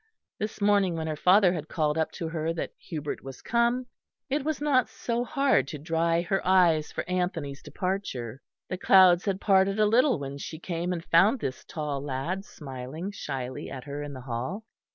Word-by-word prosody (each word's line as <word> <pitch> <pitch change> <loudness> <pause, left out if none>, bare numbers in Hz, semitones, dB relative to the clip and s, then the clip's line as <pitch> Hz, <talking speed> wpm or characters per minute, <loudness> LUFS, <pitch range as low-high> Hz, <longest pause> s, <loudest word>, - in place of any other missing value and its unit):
This 215 +1 -4
morning 200 -4 +3
when 160 -1 -3
her 155 -1 -2
father 180 +3 +5
had 160 -3 -4
called 150 -2 0
up 160 -1 0
to 170 - -4
her 160 0 -2
that 165 - -4
Hubert 150 -3 -5
was 135 -1 -9
come, 235 +2 +1 0.5
it 285 0 +1
was 310 0 -1
not 285 -4 +2
so 235 0 -2
hard 275 - +2
to 150 - -5
dry 165 +2 +1
her 195 +2 0
tears 175 -5 +4
for - - -4
Anthony's 175 -6 -2
departure. 140 - -4 0.3
The 185 - -4
clouds 185 -2 +6
had 195 -2 0
parted 195 0 +3
a 215 - +5
little 250 - +4
when 140 0 -6
she 160 - -6
came 175 +1 -3
and 170 -2 -4
found 195 +10 +4
this 130 -10 -4
tall 150 -3 -3
lad 145 +8 -3
smiling 140 +5 -7
shyly 130 -9 -5
at 130 -2 -7
her 145 0 -5
in 145 -1 -6
the 130 - -8
hall. 130 - -4
170 Hz, 190 wpm, -27 LUFS, 145-200 Hz, 0.5 s, clouds